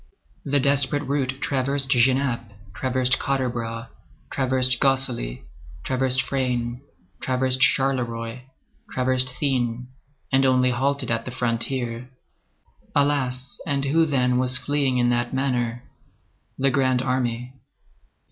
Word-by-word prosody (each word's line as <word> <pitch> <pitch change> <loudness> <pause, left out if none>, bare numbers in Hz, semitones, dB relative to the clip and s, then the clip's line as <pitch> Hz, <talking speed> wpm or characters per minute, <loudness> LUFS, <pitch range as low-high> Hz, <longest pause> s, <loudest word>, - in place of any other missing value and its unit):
The 145 0 +1
desperate 140 +1 +2
route 135 -1 -1
traversed 135 0 +1
Genappe, 130 -2 +2 0.2
traversed 130 0 +1
Quatre 135 -2 0
Bras, 115 -1 -5 0.4
traversed 130 -1 +1
Gosselies, 130 - 0 0.4
traversed 130 0 +1
Frasnes, 125 -2 -2 0.4
traversed 130 0 0
Charleroi, 125 -4 +1 0.5
traversed 130 0 +2
Thuin, 125 -3 -1 0.4
and 135 0 +3
only 130 -1 +3
halted 140 +2 -1
at 115 0 -1
the - - -5
frontier. 120 0 -2 0.9
Alas! 135 -3 0
and 140 -2 0
who, 160 +4 +3
then, 125 -3 +1
was 130 0 +4
fleeing 140 -3 0
in 120 0 +2
that 120 +1 -1
manner? 120 -3 -1 0.7
The 135 0 +2
Grand 130 -1 +1
Army. 125 -1 -2
130 Hz, 110 wpm, -23 LUFS, 125-135 Hz, 0.9 s, was